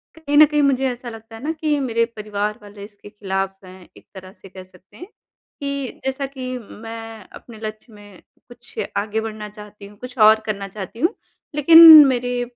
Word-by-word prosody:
कहीं 290 -3 -2
न 305 - +9
कहीं 300 0 -1
मुझे 270 -1 +1
ऐसा 245 0 -9
लगता 225 0 -12
है 225 - -12
ना 310 - -2
कि 300 -2 0
मेरे 230 -4 0
परिवार 210 0 -4
वाले 205 -1 -13
इसके 205 0 -14
खिलाफ़ 195 -1 -5
हैं, 185 -1 -15
एक - - -20
तरह 185 -1 -12
से 195 - -17
कह 185 0 -12
सकते 185 0 -22
हैं 355 - -10 0.5
कि 280 -2 -5
जैसा 265 +1 -3
कि 255 -2 -7
मैं 225 -1 -11
अपने 235 -3 -14
लक्ष्य 215 +1 -8
में 205 -3 -16 0.3
कुछ 240 0 -17 0.2
आगे 215 +2 -2
बढ़ना 215 -1 -7
चाहती 210 -1 -14
हूँ, 205 0 -18
कुछ 250 +3 -11
और 215 0 +5
करना 200 -2 -4
चाहती 195 +3 -10
हूँ 340 - 0 0.4
लेकिन 320 0 +9
मेरे 245 -1 -2
225 Hz, 190 wpm, -20 LUFS, 205-265 Hz, 0.5 s, न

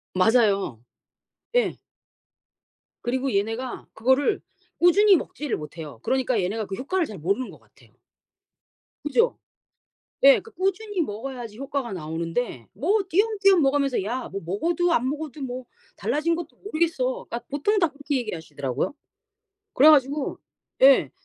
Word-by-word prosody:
맞아요. 200 - +3 0.7
예. - - +2 1.3
그리고 260 +1 -1
얘네가 225 +5 -2
그거를 265 - +2 0.4
꾸준히 390 +3 +6
먹지를 300 -2 -3
못해요. 150 -5 -9
그러니까 255 -5 +1
얘네가 210 +4 -2
그 195 - -5
효과를 335 - -1
잘 210 - -8
모르는 200 +10 -1
것 - - -13
같아요. - - -24 1.1
그죠? 460 - +2 0.9
예, 275 0 +8
그 450 - -15
꾸준히 390 +1 -1
먹어야지 235 -2 -5
효과가 275 -4 -3
나오는데 165 - -3
뭐 370 - +1
띄엄띄엄 395 -1 +4
먹으면서 275 -5 +2
"야, 245 +5 -3
뭐 195 - -4
먹어도 335 - 0
안 255 0 +2
먹어도 300 0 -5
뭐 255 -1 -5 0.3
달라진 300 +10 0
것도 340 -1 -7
모르겠어." 315 -9 -1
그러니까 235 - -4
보통 400 +10 +1
다 340 - +4
그렇게 285 -1 -3
얘기하시더라고요. 160 - -3 0.8
그래 300 +4 +8
가지고 285 0 +2 0.4
예. 270 0 +7
265 Hz, 315 characters per minute, -25 LUFS, 215-325 Hz, 1.3 s, 예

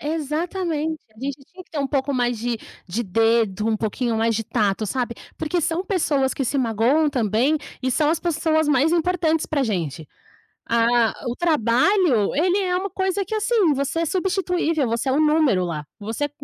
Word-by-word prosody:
Exatamente. 320 +1 -2 0.2
A - - -21
gente 275 +3 -4
tinha 370 0 -13
que - - -37
ter 310 - -4
um 280 - 0
pouco 275 0 -1
mais 245 -2 0
de 235 +1 -2 0.3
de 210 +7 -2
dedo, 225 0 +1
um 220 - +1
pouquinho 225 +2 -1
mais 225 +1 +1
de 225 +1 -2
tato, 210 -2 0
sabe, 245 +2 -2 0.2
porque 325 +3 -1
são 335 +3 -1
pessoas 290 -9 +1
que 270 - -2
se 270 - -1
magoam 250 +6 +2
também. 245 +3 +1 0.3
E 260 - 0
são 300 +4 +2
as 325 - +1
pessoas 320 -2 +1
mais 295 +3 +3
importantes 335 -2 +1
pra 290 -3 0
gente. 170 - -3 0.6
Ah, 230 0 +3 0.2
o 240 - -2
trabalho, 295 - +2
ele 360 +6 +2
é 365 -2 0
uma 385 +2 -2
coisa 380 +1 -1
que, 410 - -5
assim, 425 -5 +2
você 280 +4 -1
é - - +1
substituível. 360 -4 0
Você 230 +4 -1
é - - +2
um 285 - +2
número 300 - +3
lá. 165 -4 -3 0.2
Você 225 +8 -3
280 Hz, 185 wpm, -22 LUFS, 230-330 Hz, 0.6 s, mais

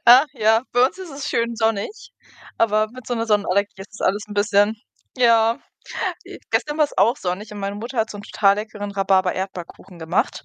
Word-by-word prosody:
ach 250 +5 +9
ja, 225 -2 +3
bei 245 +1 +5
uns 315 - -8
ist 370 -3 -8
es 280 0 -5
schön 235 0 0
sonnig, 225 - -2 0.5
aber 215 -1 +2
mit 255 0 -12
so 245 - -1
'ner 230 0 -2
Sonnenallergie 205 -1 +1
ist 195 +1 -10
das - - +1
alles 205 +2 0
'n 205 - -8
bisschen 205 +1 +3 0.4
ja. 230 -2 +4 0.7
J - - -10
gestern 295 +1 0
war's 300 -2 +1
auch 225 +7 +4
sonnig 190 +2 -4
und 210 - -7
meine 200 +1 -3
Mutter 235 +4 -6
hat 225 0 +1
so 205 - -8
'n - - -8
total 200 -1 +2
leckeren 210 -1 -5
Rhabarber-Erdbeerkuchen 190 -2 -1
gemacht 160 -1 -1
215 Hz, 195 wpm, -22 LUFS, 200-235 Hz, 0.7 s, ach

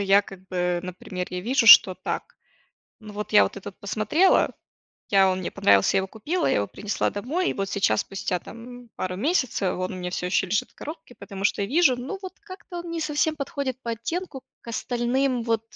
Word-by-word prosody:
я, 200 +1 +4
как 190 -1 -13
бы, 180 -1 -1
например 180 0 -6
я 180 - -4
вижу, 240 +4 +1
что 190 -4 +10
так - - -5 0.6
Ну, 215 -1 -11
вот 210 +1 -6
это 200 -1 +4
вот 195 - -9
посмотрела, 215 - +2 0.6
я 195 -1 +5
он 185 - -1
мне 185 - -4
понравился, 100 -1 +3
я - - +5
его 190 - -5
купила, 310 - -2
я - - +2
его 100 - 0
принесла 205 - -2
домой, 295 - -1
и - - -3
вот 195 -1 -2
сейчас, 195 - +1
спустя, 195 -2 -3
там, 245 +4 -11
пару 185 0 -3
месяцев, 250 - 0
он 185 +1 -3
у 185 - -6
меня 180 0 -4
всё 180 - -3
ещё 185 +1 +1
лежит 195 +3 -1
в - - -30
коробке, 320 -4 -9
потому 195 -2 -8
что 200 - +1
я 200 - -2
вижу: 285 -3 +4
ну, 265 +11 -5
вот, 370 - -7
как-то 375 -2 -10
он 345 0 -7
не 335 0 -3
совсем 305 0 0
подходит 280 -3 -3
по 235 - -3
оттенку 270 - -5 0.2
к - - -15
остальным, 245 +2 0
вот, 225 -1 0
220 Hz, 210 wpm, -25 LUFS, 190-280 Hz, 0.6 s, что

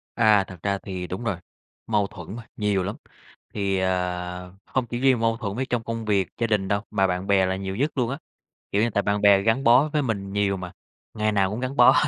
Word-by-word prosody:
À, 110 -3 +5
thật 95 -2 -11
ra 100 0 +1
thì 95 -2 -6
đúng 95 +6 -5
rồi, 100 -6 -1 0.5
mâu 105 -3 +1
thuẫn 90 +3 -9
mà, 120 - -8
nhiều 105 -3 +1
lắm. 100 +3 -3 0.6
Thì, 100 -2 0
ờ, 90 -1 -2
không 130 -2 -1
chỉ 120 +1 -4
riêng 130 -2 +4
mâu 115 0 +1
thuẫn 105 -3 -4
với 130 - -1
trong 120 -3 -2
công 115 -1 -4
việc, 100 -4 +2
gia 115 - 0
đình 105 -3 +1
đâu, 100 +1 0
mà 95 0 +2
bạn 90 +1 -2
bè 95 -1 +4
là 95 0 0
nhiều 95 0 -4
nhất 145 +8 0
luôn 120 -3 +1
á. 135 - -3 0.6
Kiểu 100 - +2
như 115 - +2
tại 100 -1 +1
bạn 100 0 0
bè 100 -1 +6
gắn 115 +6 +1
bó 125 +5 +6
với 150 -2 +1
mình 100 -6 -3
nhiều 100 -1 +1
mà, 90 -2 -7 0.4
ngày 110 -1 0
nào 100 -2 +2
cũng 110 +4 -4
gắn 130 +2 -3
bó, 120 - +7
100 Hz, 245 wpm, -24 LUFS, 95-115 Hz, 0.6 s, bó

